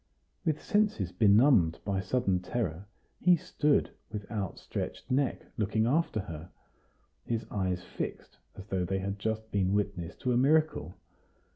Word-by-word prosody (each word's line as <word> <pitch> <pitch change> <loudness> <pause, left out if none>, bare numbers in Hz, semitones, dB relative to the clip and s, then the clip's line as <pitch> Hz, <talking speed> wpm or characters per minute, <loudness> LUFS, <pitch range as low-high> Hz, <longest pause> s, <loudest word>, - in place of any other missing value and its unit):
With 160 -4 0
senses 205 - +1
benumbed 105 - +5
by 100 -1 0
sudden 95 -2 +1
terror, 95 -2 -3 0.3
he 180 0 +6
stood, 150 -2 +1 0.2
with 105 -2 -5
outstretched 100 +2 -4
neck, 135 +1 +1
looking 110 +1 +1
after 135 -4 +1
her, 85 -3 -8 0.7
his 115 -2 -2
eyes 95 -2 -1
fixed - - -6 0.2
as 95 - -9
though 95 -3 -1
they 95 +2 -1
had 100 +1 -3
just 110 +1 -2
been 95 -1 +1
witness 100 -5 -1
to 125 - -1
a - - +3
miracle. 145 - +2
105 Hz, 140 wpm, -30 LUFS, 95-125 Hz, 0.7 s, he